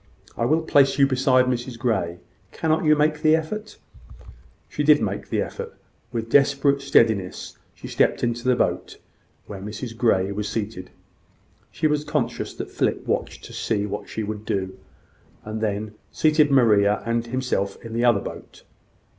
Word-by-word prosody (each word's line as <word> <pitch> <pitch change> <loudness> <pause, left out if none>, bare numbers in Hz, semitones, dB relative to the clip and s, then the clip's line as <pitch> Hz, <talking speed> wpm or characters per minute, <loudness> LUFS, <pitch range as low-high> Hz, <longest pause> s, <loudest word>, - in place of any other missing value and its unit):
I 115 - -1
will 155 +5 +2
place 140 -4 +3
you 140 - +6
beside 130 -1 +3
Mrs 125 -1 -3
Grey. 95 -8 -1 0.3
Cannot 160 0 0
you 155 0 +5
make 150 0 +1
the 155 0 +5
effort?" 210 +7 -5 0.9
She 150 - -3
did 150 0 +6
make 100 -2 -3
the - - 0
effort. - - -8 0.3
With 115 -2 -3
desperate 140 +2 +3
steadiness 110 -8 +1 0.2
she - - -10
stepped - - +1
into 120 0 -1
the 125 - +4
boat - - -1 0.5
where 100 -2 -8
Mrs 110 +3 -6
Grey 100 -5 +2
was 105 +1 -3
seated. 105 -4 -4 0.8
She 155 - -4
was 150 -1 +2
conscious - - -2
that - - -7
Philip - - -1
watched - - -3
to - - -11
see 105 -2 -1
what 105 0 -6
she 110 - -4
would 105 0 -5
do, 95 -3 -3 0.7
and 110 +1 -5
then 105 0 -2 0.2
seated 155 -1 +3
Maria 105 -7 +4
and 115 0 -1
himself 120 -6 -2
in 115 - -7
the 120 +1 0
other 120 -5 +4
boat. - - -10
120 Hz, 165 wpm, -23 LUFS, 105-140 Hz, 0.9 s, you